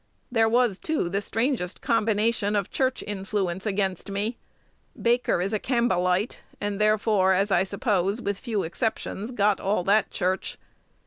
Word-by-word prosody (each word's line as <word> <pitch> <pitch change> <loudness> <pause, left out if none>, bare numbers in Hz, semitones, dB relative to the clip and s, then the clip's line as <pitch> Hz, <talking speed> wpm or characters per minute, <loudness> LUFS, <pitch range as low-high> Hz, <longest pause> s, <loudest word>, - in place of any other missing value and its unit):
There 225 -2 +3
was, 235 -4 +2
too, 310 - -1
the 195 +3 -1
strangest 225 -3 -1
combination 220 -3 +1
of 200 -1 -1
church 260 -1 0
influence 195 -1 -2
against 195 -2 -1
me. 205 +4 -2 0.6
Baker 240 -4 +2
is 195 +3 -2
a 215 - +1
Campbellite; 210 -5 +1 0.2
and 205 0 -2
therefore, 210 -3 +3
as 195 +2 +1
I 190 0 +4
suppose, 200 0 0
with 200 -4 -3
few 220 -6 -2
exceptions, 215 +3 -3
got 210 -5 +2
all 195 -2 0
that 200 +2 +3
church. 185 +1 -2
205 Hz, 145 wpm, -26 LUFS, 195-225 Hz, 0.6 s, I